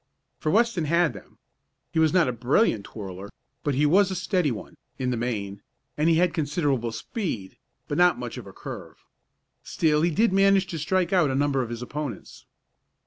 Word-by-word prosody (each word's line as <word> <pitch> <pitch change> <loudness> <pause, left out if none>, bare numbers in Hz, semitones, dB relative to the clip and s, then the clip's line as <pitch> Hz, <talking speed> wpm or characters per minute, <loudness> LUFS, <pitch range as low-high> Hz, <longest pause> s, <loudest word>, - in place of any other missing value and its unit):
For 155 - -1
Weston 220 -3 +2
had 170 +1 +2
them. - - -14 0.5
He 160 - 0
was 160 -1 +4
not 180 -5 +4
a - - +1
brilliant 120 - +1
twirler, 100 -2 -8 0.3
but 145 -3 0
he 145 +3 +3
was 190 +6 +4
a 190 - -3
steady 180 -3 0
one, 105 -7 -6 0.2
in 130 -1 -1
the - - 0
main, 105 -4 -3 0.3
and 155 +2 +2
he 165 - +4
had 175 +1 +2
considerable 145 -7 0
speed, 115 - -4 0.3
but 145 - -2
not 180 -1 +5
much 120 -1 -6
of 110 - -11
a - - -9
curve. - - -9 0.6
Still 150 -2 +1
he 170 - +3
did 210 +5 +2
manage 195 0 +4
to 165 - -3
strike 185 +4 0
out 175 -6 +4
a 130 - -1
number 140 -1 +1
of 120 - -4
his 120 0 -5
opponents. 145 +1 -7
150 Hz, 195 wpm, -25 LUFS, 120-180 Hz, 0.6 s, not